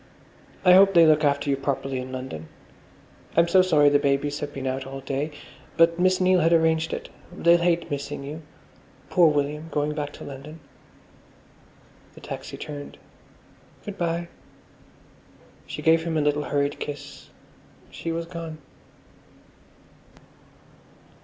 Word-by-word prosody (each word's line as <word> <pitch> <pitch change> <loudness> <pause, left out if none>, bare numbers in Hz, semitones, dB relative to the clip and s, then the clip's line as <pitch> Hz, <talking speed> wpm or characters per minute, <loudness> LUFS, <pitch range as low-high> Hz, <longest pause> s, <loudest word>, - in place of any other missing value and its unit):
"I 180 - +8
hope 195 +1 +6
they 170 -1 +8
look 155 -1 +4
after 140 0 +1
you 140 - +2
properly 135 -1 -3
in 130 0 -7
London. 130 -12 -6 0.9
I'm 170 0 +5
so 185 +2 +5
sorry 155 -6 +4
the 145 0 +3
babies 140 +1 0
have 145 -1 -5
been 135 -2 -6
out 130 +1 -3
all 135 0 -7
day, 140 +3 -2 0.5
but 165 +1 +4
Miss 185 +1 +3
Neil 185 0 +4
had 165 0 +3
arranged 160 -1 +2
it. - - -5 0.2
They'll 170 0 +4
hate 170 -2 +1
missing 140 0 -4
you. 150 +3 -7 0.7
Poor 175 -3 +6
William, 150 +1 -1
going 150 -1 -1
back 150 -1 -4
to - - -10
London." 145 +4 -9 1.6
The - - -13
taxi - - -7
turned. 145 -1 -8 0.9
"Good 205 -2 -7
bye!" 170 0 -1 1.4
She - - -7
gave 160 0 +4
him 165 -1 -2
a - - +2
little 150 0 0
hurried 145 0 -1
kiss; 145 -1 -8 0.6
she 165 - -5
was 165 0 -3
gone. 165 -2 -7
150 Hz, 140 wpm, -25 LUFS, 140-170 Hz, 1.6 s, I